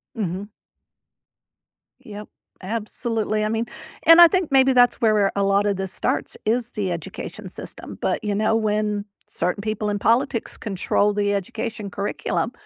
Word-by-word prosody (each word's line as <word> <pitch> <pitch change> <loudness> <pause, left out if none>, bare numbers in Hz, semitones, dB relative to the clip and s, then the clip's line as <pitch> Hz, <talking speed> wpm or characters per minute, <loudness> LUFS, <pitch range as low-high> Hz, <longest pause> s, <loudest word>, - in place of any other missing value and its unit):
Mhm. 195 -1 -3 1.5
Yup, 210 0 -10 0.3
absolutely, 215 +1 -2
I 215 - 0
mean 225 +1 -1 0.4
and 330 +1 +8
I 340 - +11
think 365 -4 -1
maybe 265 -1 +5
that's 245 -1 +4
where 220 -2 +4
where 200 -2 +2
a 200 - +1
lotta 200 +1 +2
this 190 -1 -4
starts, - - -1
is 240 +2 0
the 195 -4 -2
education 170 -3 -6
system, - - -6
but, - - -1
you 205 -1 -1
know, 215 +1 +2
when 210 -1 0 0.2
certain 180 +4 -1
people 215 0 -2
in 205 0 -1
politics 230 +1 +1
control 205 0 0
the 205 0 0
education 215 +2 -4
curriculum, 200 0 -2
210 Hz, 150 wpm, -22 LUFS, 200-230 Hz, 1.5 s, I